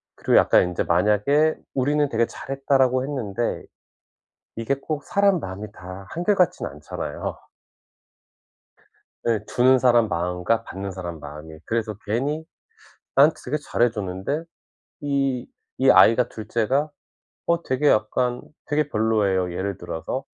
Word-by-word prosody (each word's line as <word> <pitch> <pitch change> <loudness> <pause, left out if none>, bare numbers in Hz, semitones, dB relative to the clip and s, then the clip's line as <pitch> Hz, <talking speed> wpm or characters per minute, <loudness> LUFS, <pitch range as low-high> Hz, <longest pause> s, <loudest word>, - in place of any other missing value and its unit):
그리고 - - +2
약간 - - +5
인제 90 -1 -1
만약에 105 - +3 0.2
'우리는 145 +2 +1
되게 115 +1 +2
잘했다.'라고 135 -1 0
했는데 120 -6 -3 0.9
이게 115 +4 0
꼭 145 +2 -5
사람 200 -1 +2
마음이 100 -1 -6
다 95 +1 -10
한결 175 +5 +1
같진 180 -3 +2
않잖아요. 75 +2 -6 1.9
예, 115 -2 +2
주는 130 +1 +4
사람 120 -3 +4
마음과 90 +5 -1
받는 95 +1 -6
사람 85 -3 -6
마음이. 75 +2 -10
그래서 110 -2 -2
괜히 140 +9 -1 0.7
나한테 145 +4 +6
되게 145 +5 -1
잘해 120 -5 +1
줬는데 105 - -3 0.6
이 135 -3 -1 0.3
이 135 - +5
아이가 120 +2 +6
2 110 -1 -9
째가 130 +7 +1 0.6
어 170 0 +1
되게 135 +1 0
약간 120 +3 +1 0.2
되게 150 0 0
별로예요 105 -6 +1
예를 95 +1 -3
들어서. 90 +9 -5
120 Hz, 275 characters per minute, -23 LUFS, 95-140 Hz, 1.9 s, 나한테